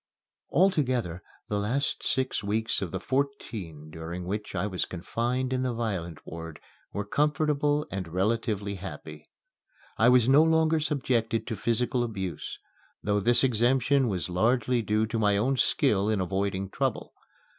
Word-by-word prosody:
Altogether 130 - +2 0.3
the 105 - -1
last 125 +8 -1
six 130 -4 0
weeks 110 +2 0
of 95 - -2
the - - -4
fourteen 105 - -3
during 85 +3 -6
which 105 +3 -4
I - - 0
was 95 -3 -1
confined 120 +8 -2
in 130 - 0
the 125 -2 -1
violent 95 -9 -3
ward 80 -1 -8 0.3
were 100 0 -3
comfortable 150 +3 +1
and 95 -3 -3
relatively 100 +3 -1
happy. 95 +1 -9 0.7
I 115 +2 +6
was 125 -2 +5
no 135 +3 +7
longer 160 0 +3
subjected 125 -7 0
to 115 - -3
physical 120 +4 0
abuse, 95 -6 -4 0.5
though 105 0 +1
this 120 +6 +3
exemption 130 +2 +3
was 90 -8 -1
largely 120 +6 +2
due 110 +1 +1
to 115 +1 -2
my 105 -2 +3
own 130 +6 +2
skill 105 -3 +2
in 110 -2 +1
avoiding 95 +1 -1
trouble. - - -2
110 Hz, 145 wpm, -28 LUFS, 95-130 Hz, 0.7 s, no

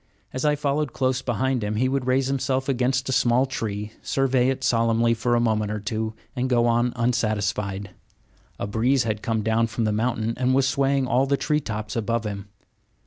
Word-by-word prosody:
As 130 +3 -2
I 150 0 +3
followed 145 -1 -1
close 130 -1 0
behind 125 0 -1
him, 105 +1 -2
he 125 +4 +2
would 135 -1 -1
raise 130 +1 +2
himself 135 0 -1
against 130 0 0
a - - -1
small 125 0 +3
tree, 105 -5 -4
survey 130 -2 +1
it 135 - -2
solemnly 115 0 +2
for 120 +1 0
a - - +3
moment 110 -3 +1
or 105 - -3
two, 110 +1 -3 0.2
and 130 0 -1
go 120 -2 +3
on 120 +1 +2
unsatisfied. 105 -5 -1 0.7
A - - -3
breeze 120 +6 +1
had 110 -2 -2
come 110 -2 -1
down 115 +1 +2
from 115 +1 -3
the 110 - +1
mountain 115 +1 0
and 130 0 +2
was 135 0 +3
swaying 135 0 +1
all 130 +1 +2
the 140 0 +2
tree 150 +2 +1
tops 105 -5 -5
above 115 0 -1
him. 100 -1 -5
120 Hz, 195 wpm, -24 LUFS, 110-130 Hz, 0.7 s, I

